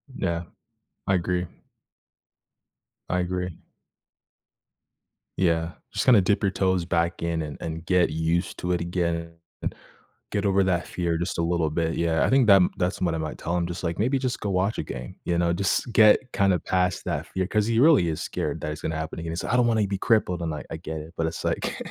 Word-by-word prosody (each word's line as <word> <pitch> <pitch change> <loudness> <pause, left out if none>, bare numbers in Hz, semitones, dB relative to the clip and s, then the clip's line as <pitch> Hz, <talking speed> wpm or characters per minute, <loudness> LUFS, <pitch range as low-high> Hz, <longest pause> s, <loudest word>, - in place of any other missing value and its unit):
Yeah. 85 -6 -1 0.6
I 95 - +2
agree. 90 0 0 1.6
I 90 - +1
agree. 90 -1 -3 1.8
Yeah. 85 -2 +1 0.2
Just - - -1
kinda 120 -6 +7
dip 100 +4 +1
your 100 - +2
toes 95 -3 +1
back 85 0 0
in 85 -1 -1
and-and 80 +2 -6
get 90 -2 +3
used 80 +3 -1
to 90 - -2
it 90 - 0
again. 85 -1 -2 1.0
Get 100 0 -1
over 95 0 +3
that 90 -2 0
fear 85 -2 -1
just 85 +1 -3
a - - +1
little 85 -2 +1
bit. 80 +1 -1
Yeah. 80 -1 +2
I - - +1
think 130 -3 +4
that-that's 95 -1 +3
what 85 -3 +1
I - - -1
might 80 -1 -4
tell 85 - -2
him. 85 - 0
Just 85 +1 -6
like, 85 +1 -2
"Maybe 130 +6 +2
just 130 -2 -2
go 105 - -3
watch 95 +3 0
a - - -1
game." - - -7
You 85 -1 +1
know? 85 0 +2
"Just 100 +6 0
get 110 -1 +7
kind 100 -1 +3
of 90 - -1
past 90 -1 0
that - - -2
fear." 95 -1 -2
'Cause 105 0 +1
he 115 0 +2
really 140 - +6
is 80 - -3
scared - - -3
that 75 - -3
it's 75 - -7
gonna 80 - -2
happen 80 +1 -4
again. 80 0 -4
Said, - - -4
"I - - +3
don't 120 - +4
wanna 110 -3 +2
be 100 0 -2
crippled." 95 -5 +1
And 80 -2 -2
I 75 - -5
I - - -3
get 80 -1 -5
it. 80 +2 -12
But 80 - +1
it's 80 - -5
like - - -1
85 Hz, 210 wpm, -25 LUFS, 85-95 Hz, 1.8 s, kinda